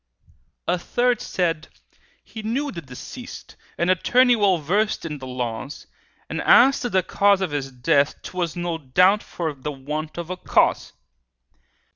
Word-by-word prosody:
A 180 0 +1
third 245 +5 0
said, 165 -4 -1 0.6
"He 220 - -9
knew 265 +7 -2
the 170 - -7
deceased, 130 -4 -10 0.2
An 175 +2 +2
attorney 245 +7 +4
well 200 -4 +3
versed 200 +8 0
in 150 -3 -5
the 130 - -8
laws, 125 +2 -5 0.4
And - - -3
as 270 +3 +6
to 245 - -2
the 190 -3 +2
cause 200 +1 +3
of 190 -5 -2
his 135 -2 -3
death, 140 +3 +1
'Twas 175 -3 -3
no 175 -2 -3
doubt 180 +9 +3
for 160 -3 -4
the 140 +2 -6
want 150 +3 -5
of 170 +1 -5
a 185 - -4
cause." - - +1
175 Hz, 155 wpm, -23 LUFS, 145-200 Hz, 0.6 s, as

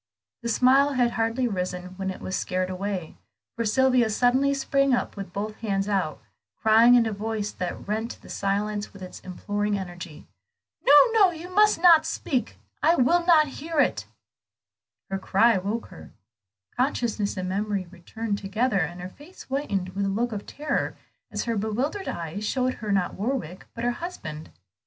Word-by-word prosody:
The 235 - -3
smile 265 +4 +4
had 245 -2 +2
hardly 230 +3 0
risen 180 -3 -3
when 190 -1 -3
it 190 - -6
was 185 - -3
scared 185 0 -1
away, 185 -3 -4 0.4
for 230 - -1
Sylvia 250 +1 +3
suddenly 250 +5 +3
sprung 275 -1 +2
up - - -3
with 195 -3 -7
both 210 +3 -4
hands 195 -3 -1
out, 190 -7 -1 0.4
crying 225 +3 +6
in 240 -2 +5
a 220 - -2
voice 210 0 -3
that 180 +1 -5
rent 220 +3 -3
the - - -16
silence 205 +1 -2
with 195 -2 -11
its 185 - -9
imploring 205 +3 -2
energy 175 -4 -8 0.6
"No, 280 - +5 0.2
no, 425 -4 +5
you 350 +2 -8
must 420 -2 +4
not 330 -2 +6
speak! 265 -5 -2 0.2
I 335 - +4
will 340 +7 +3
not 320 -3 +6
hear 320 +1 -2
you!" - - +5 1.2
Her 195 - 0
own - - -11
cry 215 +2 +3
woke 210 +5 -3
her. - - -12 0.7
Consciousness 235 -6 -1
and 185 0 -3
memory 200 0 -1
returned 205 +4 -4
together, 200 +2 0
and 175 +1 -3
her 180 - -6
face 300 - -14
whitened 210 -10 -2
with 195 +2 -2
a - - 0
look 230 +5 -1
of 205 -2 -6
terror, 295 -1 -2 0.3
as 210 -2 -3
her 230 -1 -1
bewildered 245 - -2
eyes 170 +4 -4
showed 255 +3 0
her 210 -1 -5
not 195 -3 +1
Warwick, 200 - -4
but 230 - -5
her 245 - +2
husband. 200 - -7
215 Hz, 175 wpm, -25 LUFS, 195-255 Hz, 1.2 s, crying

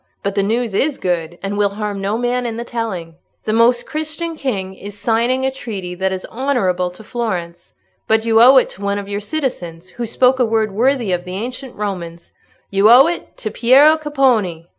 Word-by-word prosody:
But 200 - -1
the 200 - +1
news 225 +2 -1
is 275 +7 0
good, 175 -2 -2
and 200 +1 -3
will 205 -1 +3
harm 205 -1 -4
no 200 +3 -1
man 245 +1 -1
in 230 -1 -4
the 235 - -4
telling. 195 -9 -5 0.3
The 215 - -1
Most 240 +2 +3
Christian 315 +2 -4
King 200 -10 -3
is 200 +1 -10
signing 235 +5 +1
a 265 - +1
treaty 205 -9 -6
that 190 +1 -1
is 185 -1 -4
honourable 220 -9 0
to 180 +5 -14
Florence. 180 -7 -5 0.3
But 220 0 +2
you 225 0 +4
owe 260 +3 +8
it 260 - +4
to 195 - -13
one 200 0 -1
of 200 -1 -5
your 200 0 -3
citizens, 185 - -4
who 235 +3 -5
spoke 255 +3 +2
a - - +4
word 220 -1 0
worthy 240 0 +1
of 175 -1 -1
the 180 +1 -7
ancient 250 +5 -6
Romans—you 195 +1 -3
owe 250 +4 +8
it 345 +1 -4
to 215 - -4
Piero 270 +8 +5
Capponi!" 255 - 0
220 Hz, 200 wpm, -18 LUFS, 190-250 Hz, 0.3 s, owe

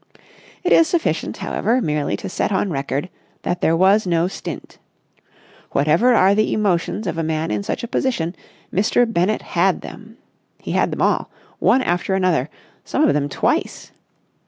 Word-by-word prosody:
It 360 - 0
is 330 - +6
sufficient, 335 +1 -1
however, 240 +3 0
merely 150 - -1
to - - -7
set 190 - -2
on 195 0 0
record 140 +2 -2 0.4
that 175 - -2
there 165 +1 +2
was 195 +3 +4
no 170 0 +2
stint. 190 - -8 0.9
Whatever 165 - +3
are 195 -1 +5
the 215 +1 +1
emotions 205 0 0
of 165 -2 -3
a - - 0
man 160 0 -2
in 105 -1 -1
such 100 - -4
a - - -3
position, 210 -9 -1 0.4
Mr. 210 +5 +3
Bennett 215 -2 0
had 180 +2 +1
them. 220 +1 -11 0.4
He - - -7
had - - +1
them - - -1
all, - - +1 0.3
one 260 - +3
after 180 +1 0
another, 175 -7 +1 0.3
some - - +1
of - - +3
them 145 -1 0
twice. - - -1
185 Hz, 165 wpm, -20 LUFS, 160-215 Hz, 0.9 s, is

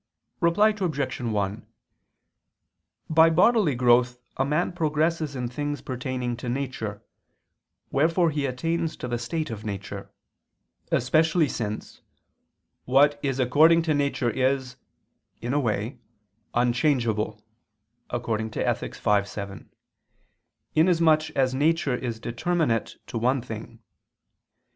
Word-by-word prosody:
Reply 175 +6 +4
Obj. 170 -13 -2
1: 105 -4 -2 1.4
By 160 +1 +6
bodily 180 - +4
growth 125 0 +3 0.2
a 135 - +1
man 150 +5 0
progresses 155 -2 0
in 125 -2 -2
things 145 +4 -4
pertaining 130 -1 -3
to 120 0 -5
nature, 120 -6 -4 0.9
wherefore 165 +4 +2
he 145 -2 -1
attains 165 +6 -2
to - - -5
the 120 -1 -2
state 155 +5 -3
of 110 -1 -6
nature; 100 -2 -6 0.8
especially 155 +5 +3
since 110 -5 -5 0.8
"what 145 +3 +4
is 135 -2 -1
according 155 +7 +5
to 160 -2 +1
nature 140 -4 0
is," 130 0 0 0.6
in 120 +3 -3
a 145 - +2
way, 115 0 -2 0.6
"unchangeable" 120 -2 +1 0.7
[*Ethic. 110 -2 -2
v, 105 -1 +2
7], 100 -1 -8 1.0
inasmuch 160 -2 +4
as 130 -1 +2
nature 145 0 +1
is 120 -3 -4
determinate 150 -1 -1
to 115 - -4
one 130 +4 +2
thing. 115 0 -9
130 Hz, 110 wpm, -25 LUFS, 120-155 Hz, 1.4 s, By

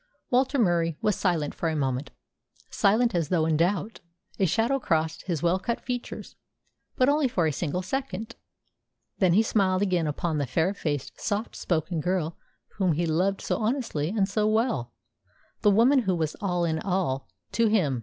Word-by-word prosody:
Walter 260 +2 +2
Murie 170 - +2
was 210 -2 +2
silent 165 -6 0
for 165 - -2
a 160 - -2
moment, 135 -1 -1 0.6
silent 225 +3 +3
as 170 -4 0
though 165 -4 +2
in 160 -1 +2
doubt. 195 +7 0 0.4
A 190 - +3
shadow 235 - +1
crossed 160 -5 -1
his 170 -4 -2
well 175 +2 +2
cut 235 +4 -2
features, 245 -1 -6 0.6
but 255 - +3
only 290 0 +3
for 180 -9 0
a 155 - +2
single 175 +4 -2
second. 230 -2 -4 0.8
Then 185 -3 +4
he 215 +5 +5
smiled 195 -3 +2
again 180 -5 +1
upon 155 +1 -1
the 140 - -1
fair 165 +8 +1
faced, 145 -8 -4
soft 210 +2 -2
spoken 165 -1 -1
girl 175 -2 -1 0.4
whom 185 -4 +2
he 170 +3 0
loved 185 +5 +1
so - - -1
honestly 220 - -1
and 200 -1 +1
so 210 +2 0
well, 220 - 0 0.7
the 210 - +5
woman 235 +7 +5
who 190 -7 0
was 160 -3 -1
all 180 -3 0
in 160 -1 0
all 180 -9 -1 0.2
to 230 -1 +2
him. 170 - +2
185 Hz, 175 wpm, -26 LUFS, 160-220 Hz, 0.8 s, he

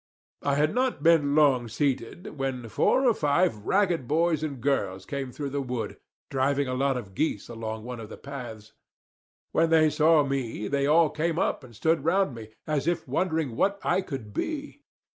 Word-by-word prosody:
I 140 - +1
had 150 +2 +2
not 255 0 0
been 155 -4 +4
long 135 -6 +4
seated, 135 - -2
when 130 -3 -3
four 260 - +2
or 235 - +5
five 150 - +2
ragged 180 -9 +2
boys 160 +1 +2
and 145 -4 -4
girls 105 -8 -1
came 140 -3 -4
through 140 +1 -5
the 140 0 -1
wood, 125 -3 -4 0.3
driving 140 +1 +1
a 130 - -2
lot 135 0 +1
of 100 -6 -8
geese 105 -2 -1
along 110 -1 -5
one 125 0 -6
of 110 -2 -8
the - - -9
paths. 120 -6 -8 0.8
When 165 0 +2
they 155 -1 +5
saw 155 0 +4
me, 130 -6 -3
they 140 0 0
all 155 +1 +4
came 160 +1 -1
up 160 - 0
and 120 -3 -14
stood 160 +9 +1
round 185 -2 +2
me, 115 -2 -9 0.2
as 150 -1 -1
if 170 -3 0
wondering 160 -3 -1
what 200 +9 +1
I 180 +2 +2
could 130 - -7
be. 295 - -4
140 Hz, 185 wpm, -27 LUFS, 125-165 Hz, 0.8 s, or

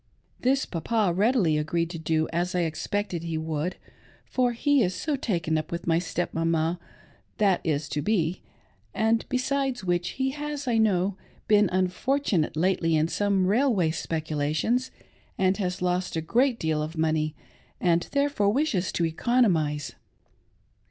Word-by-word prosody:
This 265 +2 +2
Papa 195 +2 0
readily 195 -6 +2
agreed 165 +2 -1
to 165 - -6
do, 160 0 0
as 175 +2 -1
I 180 - +2
expected 175 +3 -2
he 165 -1 -3
would, 160 +2 -2 0.5
for 250 -1 +1
he 285 +3 +2
is 185 -4 +1
so 300 -2 -1
taken 170 - -1
up 155 - -7
with 170 0 -4
my 165 -1 +3
step 175 0 -3
mama 165 +1 0 0.3
— - - -33
that 195 -4 +3
is 150 -2 -1
to 150 - -2
be 175 -1 0 0.3
— - - -38
and 225 +1 +2
besides 260 -2 -1
which 175 -1 -1
he 265 0 0
has, 295 -1 -5
I 230 -2 +2
know, 195 -3 +2 0.3
been 210 -2 +4
un 185 0 +2
fortunate 190 - 0
lately 170 -1 +2
in 155 +1 +2
some 200 -1 +1
railway 205 - +2
speculations, 160 - -1 0.5
and 190 0 +2
has 180 -2 -2
lost 180 0 0
a 160 - 0
great 245 - +2
deal 155 -1 0
of 155 +2 -5
money, 155 -1 0 0.4
and 170 -1 +2
therefore 280 -8 +2
wishes 215 - 0
to 170 - +1
economise. 165 - +1
180 Hz, 160 wpm, -26 LUFS, 160-230 Hz, 0.5 s, been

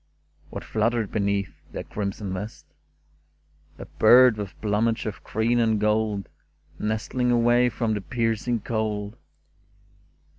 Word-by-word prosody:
What - - -7
fluttered 115 -1 0
beneath 100 -2 -1
the - - -5
crimson 100 -1 -4
vest? 105 +4 -6 1.1
A - - -8
bird 125 -2 +6
with 100 -2 -7
plumage 110 +2 0
of 105 -2 -5
green 115 +2 0
and 110 -2 +2
gold, 105 -2 0 0.5
Nestling 110 +4 -1
away 120 +1 +4
from 115 -2 -1
the 105 - -2
piercing 115 +1 -1
cold. 105 -1 -2
110 Hz, 115 wpm, -25 LUFS, 105-115 Hz, 1.1 s, bird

